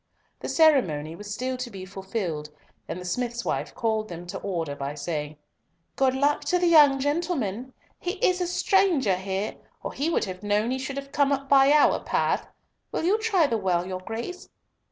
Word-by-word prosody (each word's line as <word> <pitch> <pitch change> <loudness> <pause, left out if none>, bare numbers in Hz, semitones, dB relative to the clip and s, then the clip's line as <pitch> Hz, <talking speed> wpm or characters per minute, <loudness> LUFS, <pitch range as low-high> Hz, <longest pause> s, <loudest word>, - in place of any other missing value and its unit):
The - - -5
ceremony 175 - +3
was 205 +3 -9
still 255 +4 -2
to 250 -1 -5
be 190 -4 -8
fulfilled, 190 -5 -4 0.4
and 180 - -5
the 180 - -8
smith's 240 +5 -2
wife - - -2
called 220 -2 -1
them 175 0 -7
to 190 +2 -6
order 165 -7 -3
by 140 +1 -4
saying, 150 0 -4 0.6
"Good 265 -1 +2
luck 285 +2 +1
to 360 - +2
the 355 - +1
young 295 -5 +6
gentleman. 265 - -2 0.3
He 360 - -2
is 365 -3 +1
a 355 - 0
stranger 355 - +2
here, 190 +2 -3 0.3
or - - -4
he 290 +4 -1
would 335 - +1
have 185 -1 -7
known 210 +3 +1
he 260 - -1
should 265 +1 -5
have 275 0 -6
come 285 -1 +2
up 275 0 -1
by 270 0 +6
our 300 0 +5
path! - - 0 0.4
Will - - -2
you 395 +6 +3
try 410 -7 +3
the 230 -5 0
well, 180 -3 0
your 185 0 -4
Grace?" 235 - -6
240 Hz, 195 wpm, -26 LUFS, 185-290 Hz, 0.6 s, young